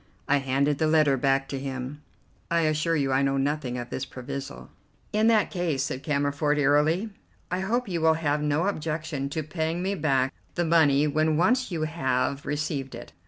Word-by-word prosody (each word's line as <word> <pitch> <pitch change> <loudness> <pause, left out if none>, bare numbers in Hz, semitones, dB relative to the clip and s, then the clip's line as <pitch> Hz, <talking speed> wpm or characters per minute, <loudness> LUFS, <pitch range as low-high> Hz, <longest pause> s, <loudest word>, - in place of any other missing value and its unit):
I 145 - +4
handed 140 +1 0
the 155 - +2
letter 155 -3 +4
back 135 +1 +1
to 135 - -3
him. 135 +1 -5 0.5
"I 170 0 +2
assure 155 +1 +1
you 140 -3 0
I 130 +1 +3
know 135 0 +1
nothing 135 -2 -1
of 120 0 -6
this 130 - -3
proviso." 130 - -7 0.4
"In 215 +1 +3
that 220 -2 +3
case," 170 -8 -1
said 130 -2 -4
Cammerford 145 0 0
airily, 150 +9 +2 0.4
"I 180 - 0
hope 230 +6 -1
you 175 -4 -2
will 160 0 +4
have 150 -2 0
no 150 +3 +1
objection 155 -6 -2
to 155 +2 -3
paying 160 +3 -2
me 195 +1 0
back 135 -7 +1 0.2
the 175 - 0
money 150 -3 +4
when 155 +1 +1
once 245 +9 +2
you 165 -4 -2
have 140 -3 -1
received 145 -2 -3
it. - - -10
150 Hz, 185 wpm, -26 LUFS, 135-165 Hz, 0.5 s, I